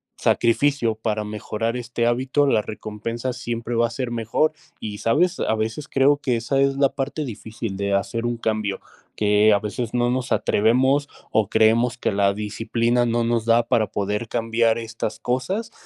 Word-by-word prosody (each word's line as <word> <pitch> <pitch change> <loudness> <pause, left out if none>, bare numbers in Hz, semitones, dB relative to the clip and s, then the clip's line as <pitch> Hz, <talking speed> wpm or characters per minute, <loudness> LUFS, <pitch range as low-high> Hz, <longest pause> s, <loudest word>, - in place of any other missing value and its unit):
sacrificio 120 -1 +2
para 110 -1 -2
mejorar 105 +2 -3
este 120 -1 -2
hábito, 130 +4 +2
la 115 -6 +3
recompensa 110 +4 -5
siempre 120 -2 -4
va 115 0 +3
a - - -10
ser 120 +1 -4
mejor. 115 +6 +1 0.3
Y 105 -1 -5
sabes, 175 - +1
a 110 - +1
veces 110 +7 -3
creo 140 +1 +3
que 130 -4 -1
esa 120 +4 0
es 140 0 +3
la 140 0 +3
parte 140 +3 -3
difícil 110 -4 -6
de 100 0 -1
hacer 100 +4 -1
un 120 0 0
cambio, 110 -3 -2 0.3
que 105 0 +4
a 100 - +3
veces 110 +3 -4
no 120 0 +2
nos 130 0 -1
atrevemos, 130 +7 +2 0.2
o 110 -2 +2
creemos 115 +3 +3
que - - -1
la 100 0 +2
disciplina 115 +3 0
no 120 0 +1
nos 115 -1 0
da 115 +1 +4
para 115 -3 +2
poder 105 +3 -2
cambiar 115 0 +1
estas 110 -1 -5
cosas. 185 - -2
115 Hz, 175 wpm, -23 LUFS, 110-125 Hz, 0.3 s, que